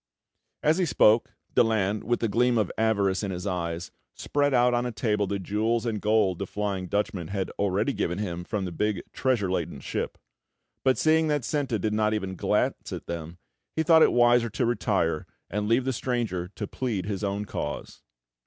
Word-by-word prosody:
As 155 Hz, +4 st, +3 dB
he 185 Hz, -, +3 dB
spoke, 110 Hz, -5 st, +4 dB, 0.2 s
Daland, 105 Hz, -2 st, +2 dB
with 120 Hz, +2 st, 0 dB
the 115 Hz, -, +2 dB
gleam 120 Hz, +3 st, +2 dB
of 105 Hz, -4 st, +1 dB
avarice 100 Hz, -4 st, +1 dB
in 100 Hz, -, -3 dB
his 90 Hz, 0 st, -4 dB
eyes, 85 Hz, -2 st, -3 dB, 0.2 s
spread 145 Hz, 0 st, 0 dB
out 125 Hz, -1 st, +4 dB
on 120 Hz, 0 st, +1 dB
a 125 Hz, -, -2 dB
table 105 Hz, -3 st, 0 dB
the 100 Hz, -, -1 dB
jewels 110 Hz, +5 st, 0 dB
and 110 Hz, -3 st, -2 dB
gold 105 Hz, -4 st, +2 dB
the 100 Hz, -, -3 dB
Flying 100 Hz, -2 st, -3 dB
Dutchman 100 Hz, -3 st, -1 dB
had 95 Hz, -1 st, -3 dB
already 100 Hz, +6 st, +1 dB
given 90 Hz, +2 st, -1 dB
him 90 Hz, -4 st, -3 dB
from 100 Hz, +1 st, -3 dB
big 95 Hz, +2 st, -1 dB
treasure 120 Hz, -8 st, +1 dB
laden 95 Hz, -, -2 dB
ship; -, -, -4 dB, 0.7 s
but 130 Hz, -1 st, +3 dB
seeing 160 Hz, 0 st, +3 dB
that 145 Hz, -5 st, 0 dB
Senta 135 Hz, -6 st, 0 dB
did 105 Hz, +2 st, -1 dB
not 110 Hz, 0 st, +2 dB
even 95 Hz, -3 st, -3 dB
glance -, -, 0 dB
at -, -, -6 dB
them, 85 Hz, 0 st, -6 dB, 0.4 s
he 160 Hz, -, +1 dB
thought 160 Hz, 0 st, +6 dB
it -, -, +6 dB
wiser 120 Hz, -1 st, +4 dB
to 120 Hz, +3 st, -1 dB
retire, 95 Hz, -9 st, 0 dB, 0.2 s
and 105 Hz, +2 st, -1 dB
leave 120 Hz, +3 st, +2 dB
the 130 Hz, -, 0 dB
stranger 115 Hz, -8 st, -2 dB
to 105 Hz, -, -3 dB
plead 110 Hz, -3 st, -3 dB
his 100 Hz, 0 st, -3 dB
own 100 Hz, +1 st, -1 dB
cause. -, -, -5 dB
105 Hz, 190 wpm, -27 LUFS, 95-120 Hz, 0.7 s, thought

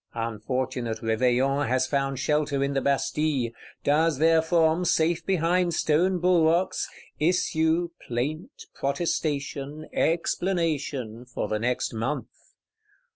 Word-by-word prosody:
Unfortunate 115 Hz, +1 st, -2 dB
Réveillon 125 Hz, +5 st, +2 dB
has 130 Hz, +1 st, +2 dB
found 135 Hz, 0 st, -1 dB
shelter 145 Hz, 0 st, 0 dB
in 140 Hz, 0 st, -1 dB
the 135 Hz, -, 0 dB
Bastille; 140 Hz, -2 st, 0 dB, 0.3 s
does 155 Hz, +1 st, +2 dB
therefrom, 160 Hz, +2 st, +3 dB
safe 165 Hz, -1 st, +2 dB
behind 175 Hz, -1 st, +1 dB
stone 175 Hz, +5 st, +2 dB
bulwarks, 175 Hz, 0 st, +2 dB, 0.3 s
issue, 165 Hz, 0 st, +1 dB, 0.2 s
plaint, 155 Hz, -, -4 dB
protestation, 145 Hz, -1 st, -2 dB
explanation, 160 Hz, -, -1 dB
for 125 Hz, -, -4 dB
the 110 Hz, -, -1 dB
next 125 Hz, +2 st, -1 dB
month. 115 Hz, +7 st, -2 dB
150 Hz, 100 wpm, -26 LUFS, 130-165 Hz, 0.3 s, therefrom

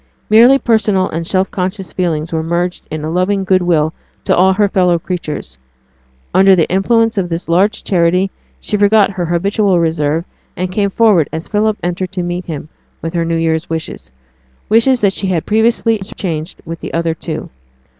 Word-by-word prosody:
Merely 240 Hz, +5 st, +7 dB
personal 215 Hz, -6 st, +1 dB
and 165 Hz, +1 st, -4 dB
self 190 Hz, 0 st, 0 dB
conscious 190 Hz, 0 st, -4 dB
feelings 165 Hz, -3 st, -2 dB
were 160 Hz, -, 0 dB
merged 175 Hz, +2 st, -2 dB
in 155 Hz, -1 st, -5 dB
a 155 Hz, -, -3 dB
loving 190 Hz, +3 st, 0 dB
good 185 Hz, -1 st, +2 dB
will 160 Hz, -3 st, +1 dB, 0.3 s
to -, -, +2 dB
all 190 Hz, +2 st, +4 dB
her 205 Hz, +1 st, +2 dB
fellow 180 Hz, -3 st, +2 dB
creatures. 155 Hz, -, -5 dB, 0.7 s
Under 190 Hz, 0 st, +6 dB
the 165 Hz, -3 st, +2 dB
influence 225 Hz, +3 st, +2 dB
of 180 Hz, -2 st, -2 dB
this 165 Hz, +1 st, -4 dB
large 195 Hz, +6 st, +1 dB
charity, 180 Hz, +1 st, +1 dB, 0.3 s
she 210 Hz, -, -2 dB
forgot 205 Hz, 0 st, +4 dB
her 180 Hz, -3 st, -3 dB
habitual 195 Hz, +2 st, +1 dB
reserve, 160 Hz, 0 st, 0 dB, 0.3 s
and 185 Hz, +1 st, -2 dB
came 200 Hz, +1 st, 0 dB
forward 195 Hz, -7 st, +3 dB
as 160 Hz, +1 st, -5 dB
Philip 215 Hz, 0 st, 0 dB
entered 180 Hz, +1 st, -2 dB
to 180 Hz, -, -2 dB
meet 175 Hz, +1 st, -4 dB
him 155 Hz, -2 st, -6 dB, 0.3 s
with 165 Hz, +1 st, -4 dB
her 170 Hz, -1 st, 0 dB
new 165 Hz, 0 st, -1 dB
year's 160 Hz, 0 st, -1 dB
wishes 160 Hz, -, -5 dB, 0.6 s
wishes 235 Hz, +4 st, +3 dB
that 200 Hz, -2 st, +3 dB
she 195 Hz, -, -2 dB
had 175 Hz, -4 st, -1 dB
previously 225 Hz, +1 st, +2 dB
interchanged 175 Hz, -4 st, -5 dB
with 165 Hz, 0 st, -6 dB
the -, -, -6 dB
other 165 Hz, -1 st, 0 dB
two. 160 Hz, -1 st, -6 dB
180 Hz, 180 wpm, -15 LUFS, 165-200 Hz, 0.7 s, Merely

